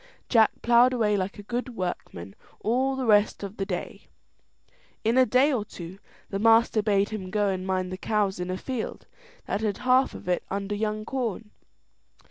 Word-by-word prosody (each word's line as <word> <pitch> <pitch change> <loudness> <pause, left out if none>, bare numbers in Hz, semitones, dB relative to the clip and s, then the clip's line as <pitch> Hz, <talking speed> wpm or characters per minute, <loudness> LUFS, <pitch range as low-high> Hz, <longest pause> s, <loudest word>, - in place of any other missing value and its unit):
Jack, 225 -3 +5
ploughed 240 +2 +5
away 215 -4 +2
like 190 0 -2
a 205 - -9
good 245 +3 -4
workman 100 - -5 0.3
all 260 +4 +1
the 265 -1 -2
rest 210 -2 +3
of 200 +1 -7
the 195 - -3
day. - - -5 1.0
In 225 +2 +2
a 260 -1 +5
day 260 +6 +4
or 230 -5 0
two 185 -1 -10 0.3
the 195 - -2
master 225 0 +4
bade 200 -2 +2
him 195 -4 -5
go 205 0 +1
and 185 -1 -3
mind 185 -1 -1
the 185 - -4
cows 205 -3 0
in 180 0 -3
a 185 - -2
field 255 +2 -5 0.4
that 205 - -2
had 210 -3 -1
half 255 +1 +3
of - - -10
it 180 -1 0
under 200 +1 -3
young 215 0 -2
corn. 230 -4 -3
210 Hz, 185 wpm, -26 LUFS, 195-235 Hz, 1.0 s, Jack